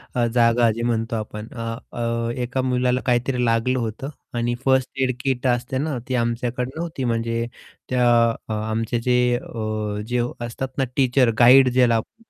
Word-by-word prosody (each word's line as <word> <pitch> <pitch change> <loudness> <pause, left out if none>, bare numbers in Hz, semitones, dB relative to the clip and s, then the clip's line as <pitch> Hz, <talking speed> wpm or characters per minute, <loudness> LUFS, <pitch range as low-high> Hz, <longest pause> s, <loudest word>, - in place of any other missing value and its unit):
अ, 120 - +2
जागा 120 -1 +4
जे 115 +2 -4
म्हणतो 115 -1 -1
आपण 105 0 -5
अ, 115 -1 -4 0.2
अ, 115 0 -2
एका 125 +2 -2
मुलाला 125 0 +1
काहीतरी 125 0 +1
लागलं 115 +3 +1
होतं 115 +4 -4 0.3
आणि 120 +1 0
फर्स्ट 130 -1 +3
एड 130 - +1
किट 130 -1 0
असते 125 +1 0
ना 145 0 -2
ती 130 - -1
आमच्याकडे 120 +1 -1
नव्हती 160 -5 -4
म्हणजे 115 0 -1 0.4
त्या 125 -1 +2 0.4
अ, 110 - -1
आमचे 110 +2 -2
जे 125 +1 +2 0.2
अ, 110 -2 -4
जे 125 0 0 0.2
असतात 125 +3 -4
ना 135 - +2
टीचर 130 -2 +3
गाईड 130 +2 +7
ज्याला 125 -2 +4
आपण 110 - -2
म्हणतो 230 0 -29
120 Hz, 170 wpm, -22 LUFS, 115-130 Hz, 0.4 s, गाईड